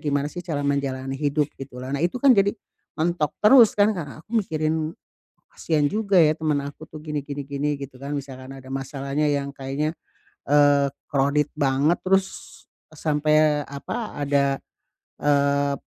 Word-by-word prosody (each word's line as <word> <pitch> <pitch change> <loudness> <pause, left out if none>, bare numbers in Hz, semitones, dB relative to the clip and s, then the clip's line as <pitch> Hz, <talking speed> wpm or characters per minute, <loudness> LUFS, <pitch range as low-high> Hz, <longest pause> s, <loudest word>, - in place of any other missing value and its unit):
gimana 145 -1 0
sih, 175 - -7
cara 155 -5 -2
menjalani 135 -2 -1
hidup, 145 0 +1
gitulah. 130 -1 -8
Nah, 140 - -1
itu 180 - -1
kan 275 -2 +7
jadi, 195 0 +4 0.5
mentok 160 -2 0
terus 230 0 +7
kan, 205 +1 +4
karena 155 -2 -7
aku - - -63 0.2
mikirin, 155 0 -1 0.6
kasihan 155 -3 0
juga 205 -1 0
ya, 155 -1 +5
teman 155 -3 0
aku 145 +2 -8
tuh, 155 - -11
gini 150 -1 -3
gini 140 0 -5
gini, 145 +1 -1
gitu 135 -2 -8
kan. 140 +1 -5
Misalkan 135 -1 -8
ada 130 0 -12
masalahnya 135 +2 -2
yang 140 -1 -1
kayaknya, 140 +4 -2 0.6
eee, 145 -1 +5 0.2
crowded 140 +1 +2
banget, 145 +3 +2
terus, 190 0 +3 0.7
sampai 150 -1 +2
apa, 210 +11 -5
ada, 140 -1 +1 0.6
eee, 140 -1 +2
145 Hz, 150 wpm, -24 LUFS, 140-155 Hz, 0.7 s, kan